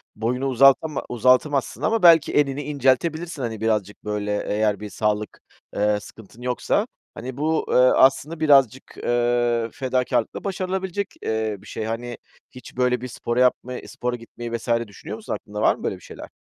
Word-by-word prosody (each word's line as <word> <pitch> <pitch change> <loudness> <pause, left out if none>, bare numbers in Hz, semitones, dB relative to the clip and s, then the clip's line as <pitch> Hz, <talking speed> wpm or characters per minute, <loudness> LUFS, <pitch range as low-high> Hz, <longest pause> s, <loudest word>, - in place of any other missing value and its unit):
boyunu 125 +4 -1
uzatama- 135 +3 +4
uzatamazsın 130 +3 +2
ama 225 -1 +1
belki 165 -3 +6
enini 145 -1 +1
inceltebilirsin, 150 +4 0
hani, 110 -3 -4
birazcık 105 -2 -1
böyle. 105 0 -2
Eğer 105 -1 +1
bir 105 0 -7
sağlık, 105 +1 -2 0.4
eee, 105 0 +2
sıkıntın 110 +2 -14
yoksa. 125 - 0 0.3
Hani, 125 +2 -7
bu, 155 +2 0
eee, - - +1
aslında 135 +5 +4
birazcık, 135 -5 +4 0.2
eee, 120 -1 +1
fedakârlıkla 125 -2 -1
başarılabilecek, 190 0 -2
eee, 110 -1 -1
bir 105 - -15
şey. 110 - -5
Hani, 120 +2 -4 0.3
hiç 125 -1 -13
böyle 125 0 +1
bir 125 - -5
spor 120 -1 -4
yapmayı, 125 0 +1
spora 125 0 -3
gitmeyi 120 0 -9
vs. 115 - -13 0.2
düşünüyor 100 - -8
musun? - - -5
Aklında - - -6
var - - +4
mı - - -13
böyle - - -1
bir - - -15
şeyler? - - -10
125 Hz, 160 wpm, -23 LUFS, 110-140 Hz, 0.4 s, belki